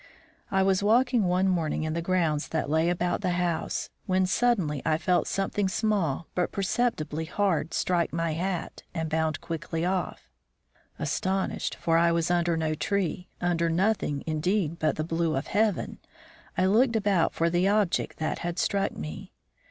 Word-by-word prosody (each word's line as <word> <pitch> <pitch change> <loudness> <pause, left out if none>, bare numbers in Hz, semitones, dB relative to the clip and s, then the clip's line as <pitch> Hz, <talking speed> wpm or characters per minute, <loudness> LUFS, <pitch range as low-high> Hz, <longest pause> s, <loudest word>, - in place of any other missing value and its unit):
I 190 0 +2
was 190 0 +2
walking 235 +1 +3
one 180 +2 +2
morning 165 -4 0
in 155 0 -2
the 170 - -1
grounds 165 -4 0
that 160 -2 -2
lay 160 +2 +3
about 175 +1 0
the 180 -3 0
house, 175 -2 -1 0.2
when 185 -1 +2
suddenly 185 - +1
I 155 0 +2
felt 175 +2 +1
something 195 0 0
small 190 - 0
but 180 - 0
perceptibly 185 -7 -1
hard 170 -3 0
strike 175 -2 +1
my 165 -1 -1
hat 180 +2 -3
and 160 -1 -2
bound 160 -1 0
quickly 165 0 -3
off. 175 - -2 0.7
Astonished, 190 +1 -1
for 165 -1 +2
I 170 0 +4
was 170 0 +1
under 170 -1 +2
no 160 -1 0
tree, 185 +1 -2
under 170 -1 +1
nothing 170 -5 0
indeed 165 +1 0
but 155 - +1
the 155 - -2
blue 165 0 0
of 135 - -2
heaven, 210 -2 0 0.6
I 185 - +3
looked 230 +5 +3
about 200 -6 +2
for 165 0 +1
the 175 +2 +2
object 205 -3 +1
that 155 - -2
had 175 0 -3
struck 200 +1 0
me. 75 0 -7
175 Hz, 165 wpm, -27 LUFS, 160-195 Hz, 0.7 s, I